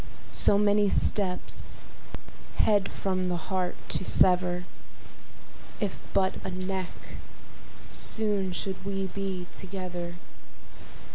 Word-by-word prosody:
So 200 - +6
many 205 0 +4
steps, 190 -3 0 0.7
head 205 -2 +3
from 185 -1 -1
the 180 -1 0
heart 185 +1 -2
to - - +1
sever, 180 -1 +4 1.2
If 205 -4 -2
but 190 -1 +1
a - - -3
neck, 185 0 -3 1.0
soon 205 -4 0
should 190 +1 -2
we 195 0 -2
be 190 -2 -3
together. 180 -2 -4
190 Hz, 95 wpm, -28 LUFS, 180-200 Hz, 1.2 s, So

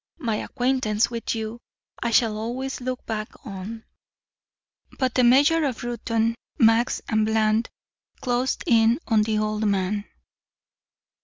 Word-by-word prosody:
My 225 -4 -1
acquaintance 245 -4 0
with 230 0 -3
you 220 +1 -5 0.4
I 235 - 0
shall 225 -1 +3
always 250 +5 -4
look 255 0 -4
back 215 +4 -6
on 210 +2 -7 0.6
" - - -29
But 260 -2 0
the 255 - +3
mayor 285 +7 +5
of 260 -6 -2
Reuton, 230 -1 0 0.2
Max 230 -1 +3
and 220 -1 +2
Bland 220 +1 +1 0.5
closed 250 +1 -1
in 230 -1 +4
on 220 -3 +4
the 215 0 0
old 215 0 0
man. 200 +1 0
225 Hz, 135 wpm, -24 LUFS, 215-245 Hz, 0.6 s, mayor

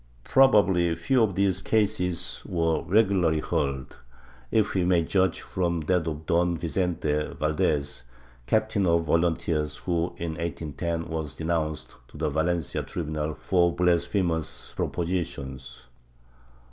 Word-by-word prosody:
Probably 95 - +4
few 100 +10 +1
of 105 -5 +2
these 95 -2 +1
cases 90 -6 0
were 80 -2 +1
regularly 90 -4 +2
heard, 70 -3 -2 0.5
if 110 - +2
we 95 - +1
may 90 -2 +3
judge 95 0 +1
from 85 -2 -1
that 85 +1 0
of 80 0 -4
Don 85 +1 +2
Vicente 80 -3 -1
Valdes, 75 -3 0 0.5
captain 110 - +1
of 85 0 +3
volunteers 80 -2 0
who, 85 -1 -2
in 85 -1 -3
1810, 85 +1 -3
was 80 -4 -4
denounced 80 -1 -2
to - - -14
the 75 - -1
Valencia 80 +1 0
tribunal 75 -2 -3
for 85 -3 +2
blasphemous 85 -1 0
propositions. 70 -7 -4
85 Hz, 120 wpm, -26 LUFS, 80-90 Hz, 0.5 s, Probably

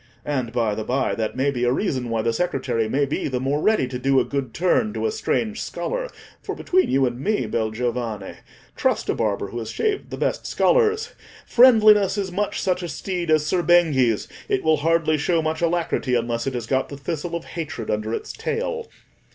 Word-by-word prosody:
And, 130 -5 -2
by 115 -3 0
the 110 - -3
by, 130 +4 0
that 110 -1 -2
may 135 +2 +1
be 125 -3 -3
a 120 - +3
reason 130 - -1
why 115 -1 0
the 115 - +1
secretary 120 -7 -1
may 140 +4 +2
be 140 - -2
the 130 -3 -2
more 140 +3 0
ready 215 -11 +2
to 125 0 -5
do 135 +1 +3
a - - +1
good 135 -4 -3
turn 210 - +1
to - - -2
a 440 - +1
strange 230 - -1
scholar. - - -3 0.3
For, - - -5
between 370 +1 +1
you 135 0 +3
and 120 -1 -3
me, 205 - 0
bel 110 0 -1
giovane—trust 115 -1 -3
a - - +3
barber 100 -3 -1
who 120 - -5
has 110 -1 -5
shaved 420 - -1
the - - -6
best - - -1
scholars—friendliness 245 - +3
is 195 -2 -2
much 200 +3 -1
such 185 -1 0
a 175 - -4
steed 175 +3 -4
as 155 -1 +3
Ser 180 +3 +1
Benghi's: 150 - +3 0.2
it - - +1
will 160 -1 +3
hardly 155 0 +2
show 170 +3 +1
much 155 0 -2
alacrity 170 -6 0
unless 120 +1 -1
it 135 - -2
has 120 -2 -3
got 130 +3 0
the 140 - -7
thistle 165 +4 -4
of 170 - -5
hatred 155 -9 -5
under 110 +1 -2
its - - -4
tail. 475 0 -3
145 Hz, 205 wpm, -23 LUFS, 120-185 Hz, 0.3 s, a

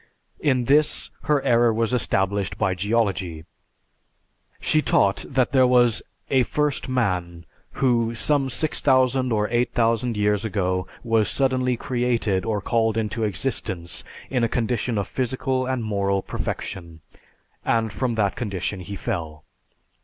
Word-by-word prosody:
In 130 -5 +1
this, 150 +4 +2
her 145 -2 +2
error 120 0 +4
was 115 +2 0
established 100 -4 0
by 100 -3 +1
geology. 95 -5 -1 1.1
She 155 - +2
taught 100 -8 +2
that 130 -2 +1
there 130 -2 +5
was 120 -3 +4 0.3
a 130 - +4
first 145 +2 -1
man 90 -9 -1 0.3
who, 120 -3 +1
some 135 +2 +1
6000 130 -2 +2
or 105 -1 +1
8000 120 -1 +1
years 105 -1 +1
ago, 95 -4 -1 0.2
was 115 -3 +2
suddenly 130 -2 +1
created 120 -7 0
or 105 -2 -1
called 115 +1 +1
into 110 +1 -1
existence 95 -4 -2 0.3
in 125 -3 +1
a 115 - +2
condition 120 0 -1
of 100 -1 -1
physical 130 0 -1
and 130 -2 -1
moral 100 -2 0
perfection, 85 -4 -5 0.6
and 115 -2 0
from 120 +3 -1
that 100 -3 +1
condition 100 -3 -3
he 95 +3 -7
fell. 80 -9 -4
115 Hz, 130 wpm, -23 LUFS, 100-125 Hz, 1.1 s, there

